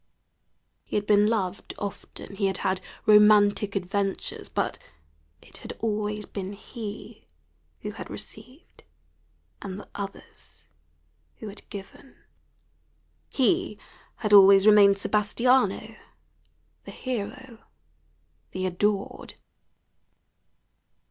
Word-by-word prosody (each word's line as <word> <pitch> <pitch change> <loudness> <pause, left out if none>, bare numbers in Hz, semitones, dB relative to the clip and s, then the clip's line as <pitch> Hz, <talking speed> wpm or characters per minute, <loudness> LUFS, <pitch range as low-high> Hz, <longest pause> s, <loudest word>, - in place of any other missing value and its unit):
He - - -7
had 205 0 0
been 205 0 +4
loved 195 -5 -2
often; 200 0 -7
he 195 0 +1
had 190 -1 -1
had 190 -1 +1 0.2
romantic 210 -1 +5
adventures, 195 +1 -3
but - - -2 0.6
it - - -16
had - - -8
always 210 -1 -2
been 195 0 -6
he 210 0 -9 0.5
who - - -5
had - - -9
received 265 +6 -9 0.8
and 195 0 -6
the - - -11
others 200 -1 -9 0.7
who 220 - -8
had 200 - -8
given; 200 +7 -10 1.2
he 345 +7 +1 0.4
had 210 -2 -2
always 195 0 +8
remained 205 -2 +7
Sebastiano, 235 +6 +1 0.9
the - - -9
hero, 255 0 -6 0.9
the 185 0 -2
adored. 195 +2 -2
205 Hz, 95 wpm, -26 LUFS, 195-215 Hz, 1.2 s, always